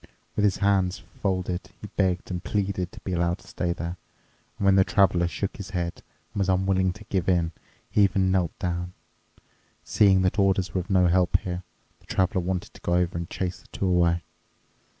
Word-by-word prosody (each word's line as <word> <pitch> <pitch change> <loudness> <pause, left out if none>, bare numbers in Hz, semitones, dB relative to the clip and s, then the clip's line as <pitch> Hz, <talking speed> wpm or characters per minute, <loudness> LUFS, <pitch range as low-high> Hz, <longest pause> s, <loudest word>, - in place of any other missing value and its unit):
With 105 - +2
his 100 - +2
hands 95 -2 +1 0.2
folded 95 -2 -1
he - - -8
begged 95 -2 0
and 90 -1 -3
pleaded 95 -3 -1
to - - -11
be 95 - -4
allowed 85 +1 +1
to - - -19
stay 90 -1 -2
there. 85 +1 -4 0.6
And 100 - -2
when 100 - +6
the 95 - +6
Traveler 90 -3 +3
shook 95 +3 -3
his 100 -3 -7
head 85 -3 -3 0.3
and - - -3
was 100 -1 +1
unwilling 95 0 +2
to 105 - -12
give 95 -3 -1
in, 85 -3 +2 0.4
he 105 - +3
even 95 -1 +3
knelt 90 -4 0
down. 90 0 -3 0.9
Seeing 95 -3 +4
that 95 +3 +1
orders 95 -1 +2
were 95 - +1
of 90 - -12
no 95 -2 +4
help 90 0 +3
here, 90 -1 -4 0.4
the - - -26
Traveler 95 +1 +1
wanted 95 +3 -3
to - - -15
go 85 - +1
over 90 -1 +1
and 85 0 -4
chase 90 -1 -3
the - - -21
two - - -3
away. 85 -2 +3
95 Hz, 200 wpm, -26 LUFS, 90-95 Hz, 0.9 s, when